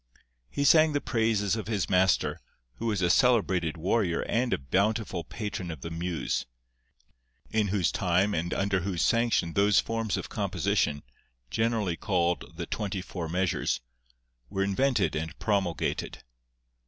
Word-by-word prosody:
He 140 - -2
sang 155 +1 +6
the 145 - +2
praises 110 -5 +1
of 110 -2 -5
his 105 -5 -1
master, 95 +1 +2 0.4
who 115 - -3
was 105 -4 0
a 90 - +3
celebrated 95 -9 +2
warrior 90 0 +1
and 120 +1 0
a - - +2
bountiful 100 - 0
patron 105 -4 -5
of 80 -5 -7
the 85 - -6
muse, 85 -6 -2 1.0
in 110 -2 +2
whose 95 -3 +1
time 95 +3 +1
and 85 0 -2
under 100 -1 +1
whose 90 -2 -1
sanction 115 -8 +2
those 100 0 +4
forms 115 -3 -1
of - - -5
composition, 70 0 0 0.5
generally 110 - 0
called 90 -4 0
the 85 +1 -4
twenty 100 -2 -3
four 85 -4 -5
measures, 90 -5 0 0.7
were 95 - -1
invented 125 +7 +1
and 80 0 -4
promulgated. 95 -7 -1
95 Hz, 140 wpm, -28 LUFS, 85-110 Hz, 1.0 s, sang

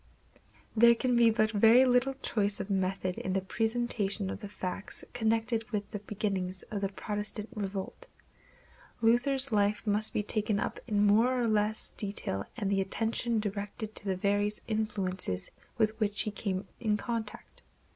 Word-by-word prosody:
There 235 +1 +7
can 250 +1 +1
be 235 -1 +6
but 215 -1 +2
very 225 +4 +6
little 255 +2 +3
choice 205 -2 0
of 200 - -4
method 190 -1 -1
in 185 - -2
the 195 - +1
presentation 220 -1 0
of - - -6
the 205 - -7
facts 190 0 -5
connected 225 0 0
with 205 -2 -3
the 205 - -4
beginnings 195 -3 -3
of 205 -2 -2
the 195 - 0
Protestant 210 +1 -4
revolt. 195 -3 -5 0.9
Luther's 245 +4 +3
life 205 0 +1
must 210 +1 +3
be 210 - -1
taken 210 0 +1
up - - -3
in 210 -2 +2
more 230 +5 +4
or 240 - +1
less 215 0 +1
detail 195 - -3
and 200 -4 -1
the 195 -1 +2
attention 225 +3 0
directed 205 +1 -4
to 210 - -7
the 190 -1 0
various 205 +2 +1
influences 195 - -2 0.3
with 220 -1 +1
which 210 -1 +1
he 215 - -3
came 195 -2 -3
in 215 -3 +1
contact. 225 -1 -5
210 Hz, 160 wpm, -30 LUFS, 200-225 Hz, 0.9 s, There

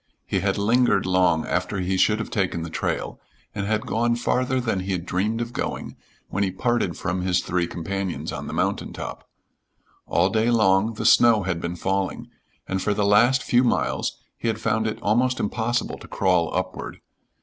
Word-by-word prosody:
He - - 0
had - - 0
lingered 105 -1 +3
long 90 -3 +2
after 90 +3 -1
he 95 +1 0
should 105 +3 +3
have 110 - -5
taken 90 -5 -1
the 85 - -6
trail - - -3 0.3
and 100 -1 -3
had 110 0 0
gone 120 +1 +1
farther 125 +2 0
than 110 -6 -1
he 95 +1 -3
had 90 -2 -3
dreamed 105 +6 -1
of 120 0 -4
going - - -4 0.3
when 100 - -2
he 100 - +2
parted 100 -1 -1
from 90 0 -2
his 90 0 +1
three 90 -1 -1
companions 95 +2 -4
on - - -6
the - - -5
mountain - - -1
top. - - -7 0.8
All 90 +3 +2
day 110 +1 +2
long 110 -1 +3
the - - -4
snow 115 -4 +6
had 90 -2 -2
been 85 +1 -3
falling, 95 +2 -2 0.4
and 95 0 -2
for 105 +1 0
the 105 - +1
last 120 +6 +4
few 125 +1 +3
miles 120 - 0 0.2
he - - -3
had 115 - 0
found 110 0 0
it 110 - -3
almost 125 +5 +2
impossible 120 +3 -1
to - - -12
crawl 90 -4 +1
upward. 90 0 -4
100 Hz, 190 wpm, -24 LUFS, 90-115 Hz, 0.8 s, snow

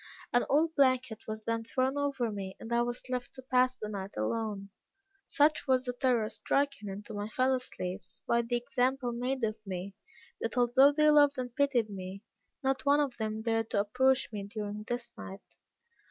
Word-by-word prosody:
An 245 - +3
old 315 +3 +3
blanket 255 -6 +2
was 215 0 -5
then 230 0 -1
thrown 260 +4 0
over 280 -5 0
me, 195 -2 -5
and 230 - -5
I 235 - +3
was 240 +1 -3
left 250 -1 -4
to 260 - -10
pass 255 0 +2
the 215 - -5
night 200 -2 -6
alone. 200 - -2 0.6
Such 300 0 +2
was 260 -1 +3
the 245 - -2
terror 245 -3 +2
stricken 275 -3 -1
into 205 +3 -7
my 205 +1 -4
fellow 255 +2 +2
slaves, 180 -7 -6
by 235 0 +3
the 240 +1 -1
example 255 0 0
made 250 +2 -2
of 215 0 0
me, 190 -1 -5 0.5
that 230 +2 -3
although 250 +3 +6
they 305 +1 +4
loved 290 -2 +5
and 245 -2 -4
pitied 260 -6 +2
me, 190 +1 -7 0.4
not 270 0 0
one 285 +1 +4
of 280 -4 0
them 220 0 -3
dared 225 -1 0
to - - +1
approach 260 +5 +2
me 200 -1 -4
during 210 0 -5
this 240 -1 -3
night. 195 +1 -8
240 Hz, 185 wpm, -31 LUFS, 215-265 Hz, 0.6 s, although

